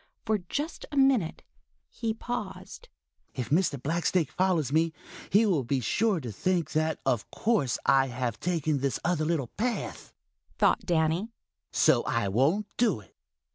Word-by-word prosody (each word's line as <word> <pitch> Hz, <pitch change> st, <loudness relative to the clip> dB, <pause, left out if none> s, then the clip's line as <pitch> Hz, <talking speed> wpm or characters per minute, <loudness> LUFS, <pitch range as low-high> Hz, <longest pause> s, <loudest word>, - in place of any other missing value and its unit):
For 215 Hz, -2 st, +1 dB
just 290 Hz, -, -4 dB
a 290 Hz, -, -4 dB
minute 265 Hz, -11 st, +3 dB, 0.4 s
he 225 Hz, -, -3 dB
paused. 235 Hz, -1 st, -6 dB, 0.5 s
"If 125 Hz, -1 st, -4 dB
Mr. 160 Hz, -3 st, +2 dB
Blacksnake 165 Hz, +2 st, 0 dB
follows 180 Hz, -7 st, +1 dB
me, 160 Hz, +1 st, +2 dB, 0.4 s
he 210 Hz, +4 st, +5 dB
will 175 Hz, -10 st, +2 dB
be 130 Hz, +3 st, 0 dB
sure 200 Hz, -, +1 dB
to 120 Hz, -4 st, -5 dB
think 170 Hz, -, -1 dB
that 155 Hz, 0 st, 0 dB
of 125 Hz, -6 st, 0 dB
course 205 Hz, -, +1 dB
I 135 Hz, 0 st, +4 dB
have 120 Hz, -2 st, -3 dB
taken 160 Hz, -4 st, 0 dB
this 135 Hz, 0 st, -1 dB
other 165 Hz, -3 st, +1 dB
little 155 Hz, -7 st, -1 dB
path," 235 Hz, +1 st, -3 dB, 0.5 s
thought -, -, +2 dB
Danny, 165 Hz, +4 st, +1 dB, 0.4 s
"so -, -, +4 dB
I 115 Hz, -4 st, 0 dB
won't 140 Hz, -, +2 dB
do 230 Hz, -, +2 dB
it." 95 Hz, -, -19 dB
165 Hz, 150 wpm, -28 LUFS, 135-205 Hz, 0.5 s, he